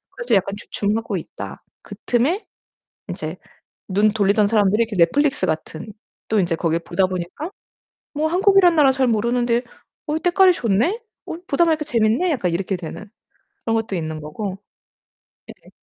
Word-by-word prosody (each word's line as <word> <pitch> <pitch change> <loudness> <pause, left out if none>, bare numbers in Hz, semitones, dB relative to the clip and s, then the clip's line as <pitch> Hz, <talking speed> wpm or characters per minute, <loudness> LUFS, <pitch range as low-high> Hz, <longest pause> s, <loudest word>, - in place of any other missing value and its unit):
그래서 480 - 0
약간 195 +1 +1
주춤하고 215 +2 -2
있다. - - -8 0.2
그 - - -10
틈에 280 - +1 0.6
인제 - - -5 0.5
눈 205 +3 +3
돌리던 205 0 +2
사람들이 210 0 +3
이렇게 225 -2 -6
넷플릭스 275 - +2
같은 160 +2 -4 0.4
또 220 - +2
인제 175 -3 +1
거기에 165 0 0
보다 185 +3 0
보니까 185 - -5 0.6
뭐 310 +1 0
한국이란 370 0 +5
나라 280 -3 +5
잘 260 0 +1
모르는데 235 +2 +1 0.4
'어 305 +1 -1
때깔이 365 +2 +5
좋네? 245 - 0 0.3
어 - - -5
보다 290 +5 +3
보니까 315 -2 +1
재밌네?' 235 +6 +1
약간 185 - 0
이렇게 190 +2 -1
되는 185 +4 -8 0.6
그런 225 - +1
것도 225 -3 -2
있는 160 -1 -4
거고. 190 +6 -5 0.9
예. - - -14
225 Hz, 330 characters per minute, -21 LUFS, 190-295 Hz, 0.9 s, 한국이란